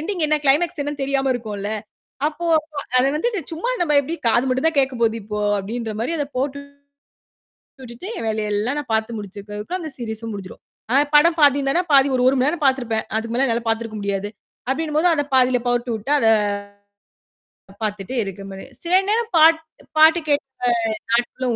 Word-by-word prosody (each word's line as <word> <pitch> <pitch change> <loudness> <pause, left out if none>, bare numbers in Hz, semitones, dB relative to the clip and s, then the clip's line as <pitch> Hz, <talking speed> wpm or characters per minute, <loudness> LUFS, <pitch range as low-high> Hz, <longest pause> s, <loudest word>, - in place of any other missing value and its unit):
Ending 340 0 -2
என்ன, 305 - +2
climax 295 +3 +2
என்னன்னு 290 -1 -4
தெரியாம 270 0 0
இருக்கும்ல. 210 -4 -4 0.6
அப்போ 310 +2 -4 0.5
அதை 260 - +3
வந்து 400 +10 0 0.2
சும்மா, 355 +10 -2
நாம 315 -4 +2
எப்படி 300 +4 -4
காது 240 +2 +3
மட்டும் 260 +4 +1
தான் 320 - -4
கேட்கப் 265 -3 +1
போகுது 225 -1 +2
இப்போ 210 +1 -5 0.2
அப்படின்னுற 220 +2 -4
மாதிரி, 245 +9 -1
அதை 290 - -1
போட்டு 275 +1 -2 1.2
விட்டுட்டு 245 +9 -9
என் - - -4
வேலையெல்லாம் 220 +6 -1
பாத்து 220 +1 0
முடிச்சு 205 -1 -9
இருக்கேன். 205 +1 -8
அதுக்குள்ள 350 - -4
அந்த 315 - -6
சீரிஸும் 225 -2 -5
முடிஞ்சிரும். 195 -2 -9 0.5
படம் 330 +3 +5
பாத்தீங்கன்னா, 285 +3 +4
பாதி, 275 0 +6
ஒரு 250 - +1
1 265 - +4
மணி 255 - +2
நேரம் 325 -1 -3
பாத்துருப்பேன். 245 -5 +1
அதுக்கு 230 +1 -4
மேல 270 +2 +3
என்னால 230 -1 -1
பாத்துருக்க 225 -1 -2
முடியாது 200 0 -2 0.4
அப்படின்னு 300 +2 -2
போது, 335 +3 +4
அதைப் 290 -2 -2
பாதியில 250 -1 +4
போட்டுட்டு, 240 0 -1
அதை 225 -3 +4 1.5
பாத்துட்டு 210 +3 -3
இருக்க 195 0 -7
மாதிரி. 195 - -9 0.2
சில 345 +2 +2
நேரம் 460 +1 0
பாட்டு, 320 0 +3
பாட்டு 320 +2 +7
கேக்கும் 245 -6 -1
நாட்களும் 240 +1 0
255 Hz, 165 wpm, -21 LUFS, 225-295 Hz, 1.5 s, பாட்டு